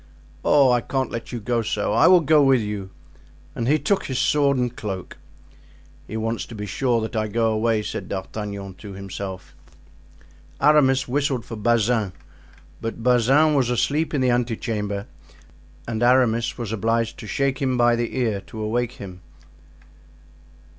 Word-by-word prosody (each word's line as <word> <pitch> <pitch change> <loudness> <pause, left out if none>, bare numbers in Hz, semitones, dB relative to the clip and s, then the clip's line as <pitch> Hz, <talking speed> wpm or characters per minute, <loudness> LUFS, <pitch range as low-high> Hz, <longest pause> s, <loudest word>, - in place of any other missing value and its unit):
"Oh, 140 -3 +5
I 120 -1 +3
can't 130 +1 -2
let 115 - -6
you 120 - -4
go 115 +2 0
so! 105 -1 -1
I 115 - +5
will 180 -1 +7
go 155 0 +4
with 135 -2 +4
you." 105 -2 -5 0.6
And 115 - -3
he 150 +3 +4
took 200 +5 0
his 130 - -3
sword 140 -1 +2
and 125 -1 -1
cloak. 95 -4 -6 0.9
"He 110 - -5
wants 115 +1 -2
to 115 - -9
be 105 -1 -5
sure 120 +3 0
that 110 +1 -5
I 110 -1 0
go 115 +1 +1
away," 110 0 +1
said - - -5
D'Artagnan 100 0 -5
to 100 -2 -9
himself. 95 -1 -7 1.0
Aramis 135 -3 +4
whistled 135 -2 -1
for 115 - -7
Bazin, 110 -2 +1 0.7
but 115 0 -5
Bazin 130 +6 +4
was 130 -4 +2
asleep 150 +6 0
in 140 - +1
the 125 -1 +3
ante 120 -1 0
chamber, 105 -3 -3 0.8
and 115 -1 -3
Aramis 120 -2 +3
was 115 -4 -4
obliged 115 +1 -1
to 110 - -8
shake 135 +3 -1
him 130 -2 +1
by 120 0 +4
the 120 +2 -3
ear 110 -6 0
to 110 - -9
awake 120 +3 -1
him. 90 -5 -10
115 Hz, 165 wpm, -23 LUFS, 105-130 Hz, 1.0 s, will